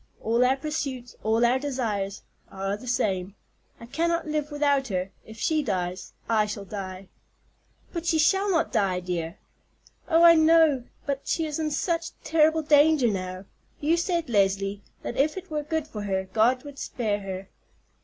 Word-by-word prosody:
All 230 +2 +2
our 260 +2 +3
pursuits, 270 -4 -4
all 225 +2 +2
our 250 +2 +3
desires, 225 -8 -3 0.3
are 195 +1 -3
the 225 +5 -11
same. 195 -5 -1 0.4
I 230 - -10
cannot 335 +6 0
live 300 -1 -1
without 285 -2 +1
her. 185 -2 -2 0.2
If 220 0 -11
she 310 +7 +1
dies 185 -7 -3
I 215 -2 +2
shall 205 -1 -5
die." 190 -1 -7 0.8
"But 340 -1 -4
she 320 - +3
shall 385 +6 +3
not 335 -3 +1
die, 190 -3 +1
dear!" 175 -2 -4 0.7
"Oh, 330 0 +5
I 340 0 +10
know, 315 -5 +4 0.2
but 280 -1 -3
she 325 - 0
is 305 0 -3
in 310 -1 0
such 330 +2 -2
terrible 315 0 +3
danger 295 -3 +5
now. 185 -1 -5 0.3
You 310 +3 +2
said, 340 -1 -1
Leslie, 195 -2 +1 0.2
that - - -5
if 300 +5 +2
it 375 -2 -8
were 300 -1 -1
good 320 0 -2
for 215 -8 -6
her, 190 -2 -2
God 245 +3 +3
would 285 -1 -10
spare 215 -5 -2
her." 195 -1 -6
250 Hz, 170 wpm, -26 LUFS, 200-310 Hz, 0.8 s, I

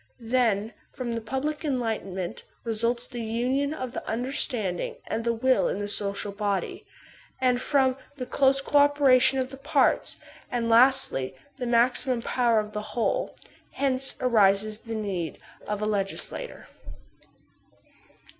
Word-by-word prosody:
Then 225 -3 +1 0.2
from 255 -3 -4
the 230 0 -2
pub* 265 +5 -3
lie 305 0 -1
enlightenment 220 - -3 0.2
results 235 +2 0
the 245 -2 -6
union 250 +6 0
of 255 -5 -4
the - - -5
imderstanding 230 -5 -2
and 230 - -3
the 235 - +1
will 255 +3 +2
in - - -2
the 205 0 -3
social 200 0 -2
body; 200 -1 -3 0.5
and 250 -1 +2
from 265 -2 +2
that 260 +2 -22
the 255 -3 -5
close 275 +1 +3
co 290 +1 +3
operation 270 -2 +5
of 260 0 -1
the 270 - -8
parts, 285 0 +1 0.3
and, 230 -1 -1
lastly, 235 - +4 0.2
the 250 - -2
maximum 240 +1 +2
power 240 -3 +2
of 210 0 -5
the 210 - -3 0.2
whole. 235 - 0 0.4
Hence 270 -1 0
arises 215 -3 +3
the 225 0 -6
need 190 -7 -3 0.3
of 210 0 -2
a - - +1
legislator. 210 - -3
240 Hz, 145 wpm, -26 LUFS, 215-260 Hz, 0.5 s, operation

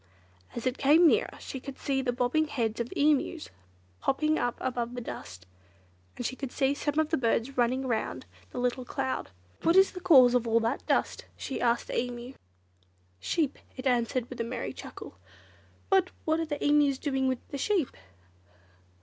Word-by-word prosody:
As 235 - -5
it 255 0 -1
came 310 +5 +6
nearer 435 +9 +2
she 265 - -6
could 275 +1 -8
see 270 -2 -1
the 255 -2 0
bobbing 250 +6 +1
heads 230 -6 -2
of 235 0 -3
Emus, 300 +2 +1 0.5
popping 305 +3 +1
up 245 0 -1
above 245 -1 -2
the - - -3
dust, 90 - -8 0.7
and 245 - -4
she 260 - -2
could 270 -2 -5
see 270 0 +1
some 290 +1 -2
of 315 -1 +2
the 320 - +1
birds 240 +2 0
running 255 +2 +1
round 220 - -2 0.2
the - - -10
little 250 +1 0
cloud. 265 +1 -3 0.3
"What 330 - +3
is 385 0 +6
the 365 - -7
cause 265 -9 +7
of 245 -2 +2
all 230 0 +4
that 225 - -1
dust?" - - 0
she 270 - -4
asked 235 -1 +2
the - - -1
Emu. 245 +1 -5 0.9
"Sheep!" 290 - -1 0.2
it 255 - -7
answered 245 -1 +1
with 245 -2 -6
a - - +1
merry 235 +1 -4
chuckle. - - -10 0.7
"But 380 -1 +4 0.2
what 315 0 +2
are 325 - -2
the 295 -2 -3
Emus 290 -2 +4
doing 265 -2 0
with 260 -1 -2
the 280 - -5
sheep?" 365 - 0
260 Hz, 185 wpm, -29 LUFS, 245-295 Hz, 0.9 s, cause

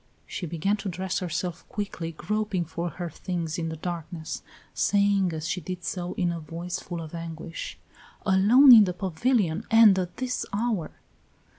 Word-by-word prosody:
She 180 - -5
began 170 +6 0
to 205 -1 -4
dress 185 +1 -2
herself 175 0 -3
quickly, 185 -5 -4
groping 210 +1 -2
for 170 +2 -3
her 175 +1 -5
things 170 0 -3
in 165 -1 -2
the 160 - -4
darkness, 165 -1 -5 0.3
saying 200 -2 +2
as 160 0 -4
she 180 +3 -2
did 180 +2 -6
so, 180 0 -3
in 175 -3 0
a 170 - -4
voice 170 +4 -5
full 170 -3 -6
of 155 - -10
anguish: 165 0 -6 0.5
"Alone, 220 +8 +7
in 220 -3 +9
the 180 - -2
pavilion, 190 +1 0
and 225 -4 +7
at 180 -1 -4
this 255 -1 -2
hour! 210 -6 -1
180 Hz, 165 wpm, -26 LUFS, 165-200 Hz, 0.5 s, in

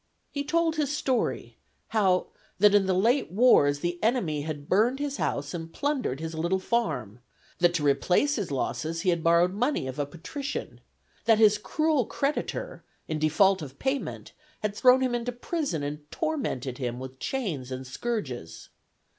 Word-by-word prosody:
He 285 - -2
told 330 +2 +1
his 295 -2 0
story, 260 -4 -1 0.3
how 190 -5 +2 0.3
that 205 +1 +6
in 200 -2 +4
the 190 - +2
late 235 - +2
wars 160 - +4
the 175 0 -2
enemy 215 - +1
had 145 -1 -5
burned 230 +7 +3
his 285 -1 -3
house 145 +1 -2
and 165 -1 -6
plundered 270 - -1
his 160 0 -5
little 170 +4 0
farm; 155 - -1 0.4
that 175 0 +3
to 155 - 0
replace 180 - +3
his 205 -7 -3
losses 155 +4 -2
he 185 - +2
had 170 -2 -1
borrowed 170 +2 +4
money 245 - 0
of 130 +2 -6
a 145 - 0
patrician, 270 - -6 0.4
that 225 -2 +5
his 210 -1 +5
cruel 310 +1 +1
creditor 300 - -3 0.2
(in 155 -2 -2
default 185 +5 +3
of 140 -3 -8
payment) 270 +1 -3 0.3
had 210 -1 -1
thrown 255 +3 +5
him 255 -2 +1
into 240 0 -1
prison, 245 - -3
and 145 +1 -6
tormented 220 - -2
him 120 -2 -3
with 130 0 -8
chains 165 - -3
and 130 0 -5
scourges. 130 - -5
190 Hz, 165 wpm, -27 LUFS, -, 0.4 s, that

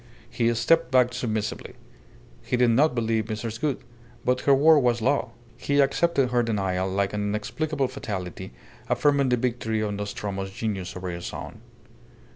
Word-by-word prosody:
He 115 -1 +1
stepped 125 +5 +3
back 125 -1 +3
submissively. 110 -4 -3 0.7
He 125 - -1
did 120 -1 +4
not 135 +4 +3
believe 110 -2 0
Mrs. 110 +1 -5
Gould. 140 -4 -1 0.4
But 125 0 +1
her 140 - +8
word 155 +3 +6
was 120 -3 +2
law. 125 +1 +1 0.3
He 145 0 0
accepted 140 -1 +2
her 120 -1 +3
denial 95 -5 -1
like 100 +1 -1
an 105 - -2
inexplicable 135 +8 -1
fatality 95 -8 -6 0.4
affirming 140 -2 +2
the 125 - +2
victory 115 -3 -1
of 105 -1 -1
Nostromo's 100 -1 -4
genius 95 -3 -4
over 90 0 -4
his 85 0 -6
own. - - -8
115 Hz, 155 wpm, -25 LUFS, 105-130 Hz, 0.7 s, her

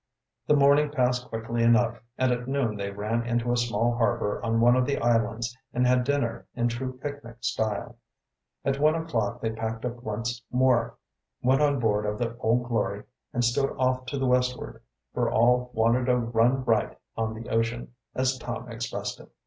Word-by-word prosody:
The 150 - +5
morning 145 +1 +5
passed 125 -3 0
quickly 115 +1 -3
enough, 115 0 +3 0.2
and 130 0 +2
at 120 0 -2
noon 135 -5 0
they 100 -1 -3
ran 105 +4 -2
into 120 0 0
a - - +2
small 120 -1 +1
harbor 115 -3 0
on 115 0 +1
one 120 +1 +6
of 125 0 +2
the 140 - 0
islands 115 0 0 0.2
and 125 +1 +3
had 125 0 +3
dinner 140 -4 -1
in 120 0 +1
true 130 +2 -4
picnic 140 -4 -7
style. 110 0 -2 0.7
At 135 0 0
one 155 +2 +4
o'clock 120 -11 -2
they 115 - -1
packed 110 +1 -4
up 120 -1 -4
once 115 +2 -3
more, 125 -2 +2 0.5
went 130 +3 +3
on 145 -2 +3
board 105 -2 +1
of 105 0 -2
the 115 0 -2
Old 120 +1 +1
Glory, 105 -3 -1 0.3
and 120 0 +1
stood 135 +4 +1
off 130 0 0
to 140 - -3
the 135 - 0
westward, 125 0 0 0.3
for - - +1
all 125 +2 +3
wanted 115 +3 +2
a 125 - +4
run 120 +2 +2
"right 115 -2 +1 0.2
on 110 0 -2
the 115 +1 -8
ocean," 115 +2 -1 0.2
as 130 0 +1
Tom 120 0 -6
expressed 115 0 -4
it. - - -14
120 Hz, 185 wpm, -27 LUFS, 115-125 Hz, 0.7 s, one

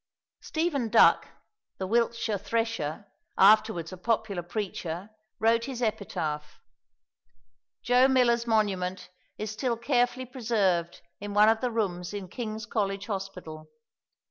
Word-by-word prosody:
Stephen 315 -8 -1
Duck, 230 - +5 0.5
the 190 - -3
Wiltshire 230 0 0
thresher, 225 -8 -2 0.3
afterwards 205 -4 +4
a - - -8
popular 215 -2 -1
preacher, 180 0 -5 0.3
wrote 230 +1 +2
his 260 -3 -5
epitaph. 165 -10 -3 1.2
Joe 250 +2 +5
Miller's 240 -3 +3
monument 190 -5 0 0.3
is 215 0 -4
still 235 +2 -1
carefully 245 +1 +1
preserved 210 -9 0 0.2
in 205 0 -6
one 210 +1 +7
of 225 0 +2
the 250 - 0
rooms 195 -5 -2
in 195 -3 -6
King's 220 0 -5
College 200 -2 -2
Hospital. 180 -6 -6
215 Hz, 115 wpm, -28 LUFS, 185-235 Hz, 1.2 s, one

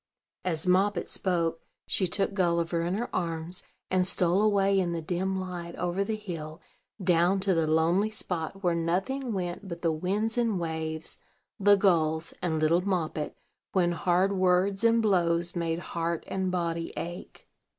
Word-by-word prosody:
As 165 -3 -1
Moppet 185 +1 +2
spoke, 170 -3 -1 0.2
she 185 - 0
took 195 +3 -1
Gulliver 170 -3 +1
in 175 +3 -1
her 235 +4 -3
arms, 170 +1 -3 0.3
and 185 -1 +2
stole 180 +1 +3
away 200 -2 +3
in 175 -2 0
the 165 - -2
dim 190 +3 -1
light, 175 -2 -6
over 180 +3 -1
the 215 +2 -2
hill, 165 -7 -7 0.4
down 180 +1 +3
to 195 -1 +2
the 165 -2 +1
lonely 165 +6 +3
spot 195 -2 -4
where 175 -1 +3
nothing 190 +11 -1
went 185 0 -3
but 170 -1 -7
the 165 - +3
winds 205 +9 -1
and 225 -6 +1
waves, 160 -1 -3 0.4
the 205 +1 +6
gulls, 165 -4 +2
and 160 -3 0
little 160 +3 +3
Moppet, 170 -5 -2 0.4
when 175 -2 +3
hard 180 +2 +2
words 190 +2 +2
and 230 0 +4
blows 175 -4 +2
made 165 -1 -1 0.2
heart 170 -1 -1
and 190 -1 -2
body 170 -2 -2
ache. 175 +1 -7
180 Hz, 160 wpm, -28 LUFS, 170-195 Hz, 0.4 s, the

